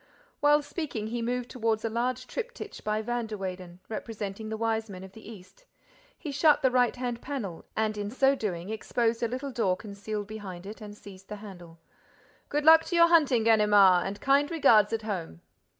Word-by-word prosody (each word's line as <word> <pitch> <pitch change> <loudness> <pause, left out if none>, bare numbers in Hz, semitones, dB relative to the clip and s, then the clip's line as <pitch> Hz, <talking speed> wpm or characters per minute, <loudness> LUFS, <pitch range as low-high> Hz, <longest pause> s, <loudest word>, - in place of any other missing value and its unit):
While 295 0 +4
speaking, 285 -8 -4
he 235 +2 -3
moved 245 +1 -2
toward 225 -2 -1
a - - +2
large 240 +3 -2
triptych 485 -3 -7
by 215 +1 -1
Van 240 0 -2
der 215 -1 -6
Weyden, 185 -2 -7
representing 215 -1 -6
the 220 - -3
Wise 225 -1 -1
Men 185 -1 -8
of 190 - -11
the 220 +2 -12
East. 220 - -15 0.5
He 300 - -6
shut 295 +1 +3
the 260 - +4
right 250 -1 +2
hand 245 -2 -4
panel 220 - -5
and, 215 -1 0
in 205 -1 -4
so 270 +4 +3
doing, 195 -6 -4
exposed 225 +1 -1
a 235 - +1
little 260 +4 -5
door 200 -7 0
concealed 205 0 -6
behind 195 -4 -8
it 215 +3 -9
and 210 -1 -9
seized 195 -2 -14
the 210 - -5
handle. 180 -5 -12 0.7
"Good 295 +1 -1
luck 320 0 +8
to 350 - -3
your 335 0 +6
hunting, 285 -9 +4
Ganimard! 205 -5 +5
And 200 +1 -6
kind 280 +2 +3
regards 230 -11 +4
at 225 -1 -2
home!" 175 - -5
220 Hz, 195 wpm, -28 LUFS, 205-255 Hz, 0.7 s, luck